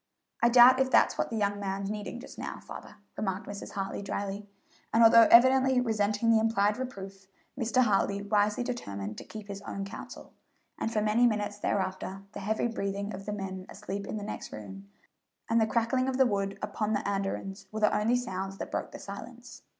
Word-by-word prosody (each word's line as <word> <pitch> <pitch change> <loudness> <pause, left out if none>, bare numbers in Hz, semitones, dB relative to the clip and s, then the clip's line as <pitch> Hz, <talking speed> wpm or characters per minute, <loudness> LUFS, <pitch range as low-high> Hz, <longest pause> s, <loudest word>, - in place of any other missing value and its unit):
"I 235 - +5
doubt 250 +2 +8
if 265 0 +2
that's - - +4
what - - -1
the 230 - -4
young 205 -1 0
man's 195 0 -3
needing 210 +3 -5
just 245 - -11
now, - - -5
father," - - -10 0.2
remarked 190 -2 -3
Mrs. 205 0 -8
Hartley 195 0 -3
dryly; 200 +1 -4 0.4
and 230 +1 +5
although 225 0 +8
evidently 260 +2 +6
resenting 220 -1 +1
the 225 - +5
implied 210 -1 +2
reproof, 195 -6 -7 0.3
Mr. 250 0 +2
Hartley 200 -2 +1
wisely 210 +2 +1
determined 105 - -5
to - - -8
keep 215 -2 -10
his 200 -1 -7
own 195 -1 -5
counsel; 195 - -10 0.5
and 225 - -1
for 215 - 0
many 220 +3 +4
minutes 205 -2 -2
thereafter 190 -1 -2
the - - -7
heavy 215 +4 -1
breathing 200 -2 -3
of 195 +2 -8
the 210 - -2
men 190 -2 -6
asleep 200 0 -6
in - - -4
the 205 - -5
next 210 - -6
room 100 -2 -9 0.6
and 225 0 +3
the 220 - +3
crackling 240 +3 +1
of 260 - -2
the 265 - +5
wood 200 -3 -1
upon 215 0 -1
the 205 - -1
andirons 195 0 -3
were 215 0 -4
the 210 - +3
only 225 +4 +2
sounds 195 -5 -3
that - - -6
broke - - -3
the - - -8
silence. 240 +5 -10
210 Hz, 195 wpm, -29 LUFS, 195-230 Hz, 0.6 s, doubt